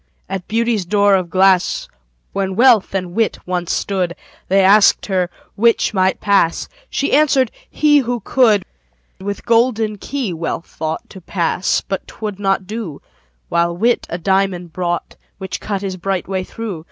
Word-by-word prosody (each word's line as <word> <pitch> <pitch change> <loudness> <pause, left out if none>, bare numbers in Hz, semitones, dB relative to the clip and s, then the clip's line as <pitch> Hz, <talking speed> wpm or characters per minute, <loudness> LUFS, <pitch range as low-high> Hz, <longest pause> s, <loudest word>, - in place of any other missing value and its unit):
At 190 -2 -5
Beauty's 230 -2 0
door 200 +2 +3
of 185 -3 +1
glass, 185 0 +3 0.5
When 190 -1 -2
Wealth 230 -4 +4
and 180 -2 -2
Wit 225 +2 +1
once 180 -1 -2
stood, 185 -3 -1 0.3
They 195 +1 +4
asked 200 +2 +5
her 185 -3 0 0.2
'which 230 +1 +2
might 190 -1 +2
pass?" 200 -5 +2 0.2
She 280 - -1
answered, 275 -5 +3 0.2
"he, 295 -1 +4
who 245 -2 -1
could." 220 -7 +3 0.5
With 200 +1 -5
golden 225 -3 +2
key 260 -8 -3
Wealth 165 0 -4
thought 160 0 -5
To 190 - -11
pass 175 +1 0
but 195 -1 -5
'twould 210 -3 -6
not 195 -1 0
do: 205 -7 -6 0.5
While 170 0 +1
Wit 235 +5 +1
a 170 - -3
diamond 185 -2 0
brought, 175 -1 -3 0.2
Which 190 -1 -5
cut 200 -2 -3
his 190 -2 -3
bright 190 0 -2
way 190 -1 -2
through. 220 -6 -6
195 Hz, 155 wpm, -18 LUFS, 180-220 Hz, 0.5 s, asked